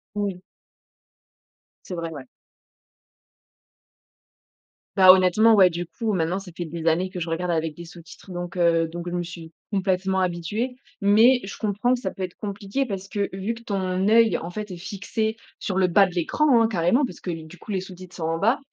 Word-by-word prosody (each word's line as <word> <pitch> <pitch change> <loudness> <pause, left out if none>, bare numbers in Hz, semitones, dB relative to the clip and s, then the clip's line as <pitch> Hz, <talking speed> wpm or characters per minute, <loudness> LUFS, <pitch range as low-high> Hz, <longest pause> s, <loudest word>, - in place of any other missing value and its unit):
Oui. 200 -3 -2 1.4
C'est 185 - -6
vrai, 165 -1 -4
ouais. 145 -4 -8 2.7
Bah, 185 -1 +9
honnêtement, 190 +5 +5
ouais 190 -3 +6
du 175 +1 -4
coup, 220 +5 -3
maintenant 180 +1 0
ça 190 -2 -11
fait 175 - -3
des 165 0 -6
années 175 +3 +1
que 185 -1 -6
je 165 0 -3
regarde 175 +2 -1
avec 160 -2 -1
des 170 - -8
sous-titres, 170 +2 -13
donc, 175 +1 -6
heu, 165 -1 +3
donc 175 +1 -6
je 175 - -4
me 175 - -1
suis 170 -1 -9 0.2
complètement 190 -1 0
habituée. 185 +8 -2 0.3
Mais, 225 +6 +5
je 195 - -7
comprends 215 +4 +1
que 250 - -3
ça 190 - -3
peut 190 - -5
être 180 - -6
compliqué, 205 +6 -3
parce 195 -4 -5
que 200 0 -1
vu 195 +4 -3
que 230 - -13
ton 190 -3 -1
œil 225 -3 +5
en 170 - -6
fait 210 +2 -6
est - - -6
fixé 200 +4 -3 0.2
sur 190 - -3
le 190 - +4
bas 195 +3 +5
de 180 - -9
l'écran, 240 - +3
hein, 225 - +4
carrément, 195 - +2
parce - - -11
que 180 - -4
du 165 +1 -7
coup, 195 - -12
les 195 -2 0
sous-titres 185 -1 -11
sont 165 - -4
en 165 0 -1
bas. 230 +9 +2
185 Hz, 200 wpm, -24 LUFS, 175-205 Hz, 2.7 s, Bah